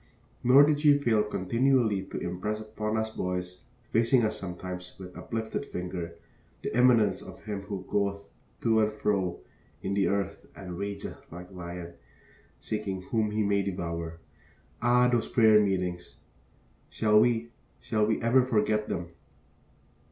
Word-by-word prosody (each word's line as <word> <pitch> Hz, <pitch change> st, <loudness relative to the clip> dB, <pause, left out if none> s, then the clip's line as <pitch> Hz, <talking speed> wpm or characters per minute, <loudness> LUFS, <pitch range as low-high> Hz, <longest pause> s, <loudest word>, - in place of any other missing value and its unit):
Nor 130 Hz, +4 st, +8 dB
did 145 Hz, 0 st, +3 dB
she 150 Hz, -1 st, +6 dB
fail 115 Hz, -6 st, +2 dB
continually 110 Hz, +1 st, +1 dB
to -, -, -7 dB
impress 90 Hz, +5 st, -3 dB
upon 110 Hz, 0 st, -3 dB
us 110 Hz, 0 st, -1 dB
boys 90 Hz, -3 st, -4 dB, 0.3 s
facing 115 Hz, +2 st, +4 dB
us 110 Hz, -, -2 dB
sometimes, 90 Hz, 0 st, -7 dB
with 90 Hz, -1 st, -10 dB
uplifted 110 Hz, +3 st, -4 dB
finger 90 Hz, -7 st, -5 dB, 0.5 s
the -, -, -3 dB
immanence 120 Hz, -3 st, +4 dB
of -, -, -11 dB
him 105 Hz, -2 st, -4 dB
who 100 Hz, -2 st, -6 dB
goeth 100 Hz, 0 st, -1 dB, 0.4 s
to 110 Hz, -1 st, +3 dB
and 110 Hz, 0 st, +2 dB
fro 100 Hz, -4 st, -1 dB, 0.4 s
in 95 Hz, -, -1 dB
the 100 Hz, 0 st, +2 dB
earth 100 Hz, 0 st, -2 dB
and 90 Hz, -3 st, -7 dB
rageth 100 Hz, 0 st, -6 dB
like 90 Hz, +2 st, -9 dB
a -, -, -14 dB
lion, 85 Hz, -1 st, -7 dB, 0.7 s
seeking 100 Hz, -3 st, -3 dB
whom 110 Hz, -2 st, +2 dB
he 105 Hz, +1 st, 0 dB
may 100 Hz, 0 st, +2 dB
devour. 85 Hz, -3 st, -4 dB, 0.6 s
Ah, 125 Hz, +1 st, +4 dB
those 120 Hz, -2 st, +1 dB
prayer 110 Hz, -3 st, +6 dB
meetings! 90 Hz, -3 st, -2 dB, 0.7 s
Shall 105 Hz, -1 st, +4 dB
we, 115 Hz, 0 st, +2 dB, 0.3 s
shall 110 Hz, -2 st, 0 dB
we 110 Hz, -, +1 dB
ever 125 Hz, +3 st, +5 dB
forget 105 Hz, -3 st, +1 dB
them? 85 Hz, 0 st, -3 dB
105 Hz, 145 wpm, -28 LUFS, 90-115 Hz, 0.7 s, Nor